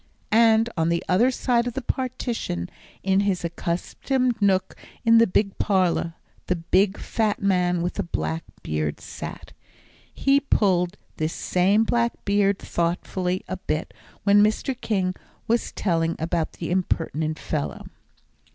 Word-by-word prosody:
And 225 0 +5
on 165 -1 +1
the 170 0 0
other 220 +8 +4
side 245 -2 +1
of 245 - -3
the 270 - -2
partition, 240 - -3 0.3
in 190 0 +3
his 195 -3 0
accustomed 230 +9 -1
nook 190 -2 +2 0.3
in 230 0 +7
the 230 - +5
big 200 +1 +1
parlour, 180 -4 +1 0.3
the 180 - +1
big 190 +4 +2
fat 215 -2 -1
man 180 -3 +1
with 175 - -1
the - - -2
black 165 -1 -3 0.2
beard 75 -1 -2
sat. - - -8 0.6
He 275 +1 +3
pulled 190 -9 +1 0.2
this 155 +1 -1
same 195 +4 +2
black 235 +1 +1
beard 200 -1 +3
thoughtfully 180 +2 -2
a 185 - -4
bit, 160 -3 -3 0.3
when 205 0 +6
Mr. 215 +5 +1
King 190 -4 0 0.3
was 235 +1 +1
telling 165 -3 0
about 165 0 -1
the 170 - -5
impertinent 160 -4 -1
fellow. 150 -2 -3
190 Hz, 140 wpm, -24 LUFS, 170-220 Hz, 0.6 s, in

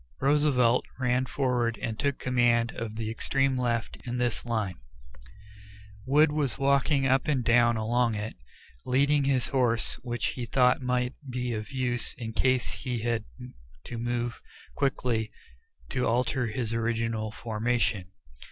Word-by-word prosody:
Roosevelt 135 -4 +3 0.2
ran 125 0 +1
forward 125 -4 0
and 115 -3 -4
took 140 -2 0
command 120 -2 +2
of 110 -1 -6
the 110 -1 -3
extreme 135 +3 0
left 120 -2 -1
of 120 +1 -2
this 120 -1 -1
line. 110 - -2 1.3
Wood 150 +3 +5
was 150 -4 -1
walking 140 0 +2
up 135 +2 +2
and 135 -5 +1
down 120 0 +4
along 115 +1 +1
it, 105 +1 -4 0.5
leading 140 +3 +2
his 130 -3 +1
horse, 120 -4 +1
which 120 -1 -2
he 125 -2 -5
thought 125 +1 +3
might 125 0 0 0.2
be 125 -1 -2
of 110 +3 -5
use 125 -3 -1
in 115 -2 -6
case 130 +1 +2
he 120 -4 -4
had 115 -2 -1 0.6
to 120 - -6
move 120 0 -2 0.3
quickly 125 -5 0 0.6
to 125 - 0
alter 125 +2 +1
his 115 0 -2
original 115 -1 -1
formation. 110 -3 -1
120 Hz, 140 wpm, -28 LUFS, 115-130 Hz, 1.3 s, Wood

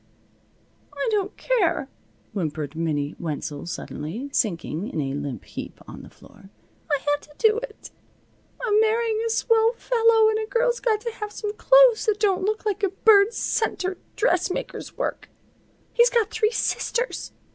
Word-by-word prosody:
"I - - -1
don't 405 -2 -1
care," 360 - +1 0.5
whimpered 155 -5 -3
Minnie 150 -3 -2
Wenzel 150 -2 -5
suddenly, 175 - -5
sinking 175 -3 -1
in - - -4
a 135 -2 -2
limp 145 -2 -5
heap - - -8
on - - -9
the - - -13
floor. 195 - -18 0.4
"I 290 - +3
had 290 - 0
to 295 - -18
do 445 -1 +3
it. - - -10 0.7
I'm 430 -4 +2
marrying 445 0 +2
a 460 - -1
swell 455 0 +3
fellow 455 -2 +3
and 435 0 0
a 435 - -3
girl's 485 +1 +1
got 435 -3 +1
to 470 - -3
have 420 -2 -6
some 415 0 -4
clothes - - +5
that 420 -1 +2
don't 390 -3 +2
look 430 +1 -1
like 415 -1 -1
a 395 - +2
Bird 400 +2 +5
Center 380 -5 -1 0.2
dressmaker's 365 +1 -1
work. - - -3 0.6
He's 475 0 +5
got 460 -4 +1
three 435 -1 +2
sisters. 485 +1 -2
425 Hz, 155 wpm, -24 LUFS, -, 0.7 s, clothes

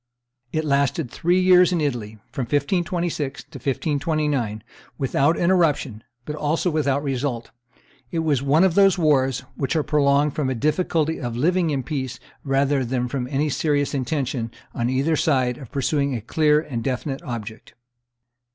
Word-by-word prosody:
It 155 +1 -1
lasted 140 -1 +1
three 175 +2 +1
years 180 0 +6
in 175 - +1
Italy, 120 -8 -2
from 130 - -3
1526 155 +1 -1
to - - -12
1529, 145 -6 -1 0.3
without 140 +3 +1
interruption, 155 - +1 0.2
but 150 - -4
also 155 +4 0
without 145 -2 0
result; 130 -3 -2 0.6
it 165 - -4
was 145 -5 +2
one 145 +5 +3
of 190 -3 +3
those 195 +1 +5
wars 135 -6 +2
which 135 +4 -2
are 155 - +2
prolonged 145 -1 +2
from 145 -4 -1
a 130 - -1
difficulty 155 +3 0
of 120 -3 -3
living 175 +5 +2
in 140 -3 -1
peace 130 -3 -4 0.2
rather 135 0 +1
than 125 0 -1
from 125 -2 -3
any 145 +3 0
serious 145 -1 0
intention, 130 -3 -2 0.2
on 120 +1 -1
either 135 +5 +1
side, 130 -5 +1
of 130 -5 -11
pursuing 140 0 0
a 115 - -4
clear 150 +6 +3
and 135 -7 -4
definite 135 +2 -3
object. 115 -2 -7
140 Hz, 155 wpm, -23 LUFS, 130-155 Hz, 0.6 s, years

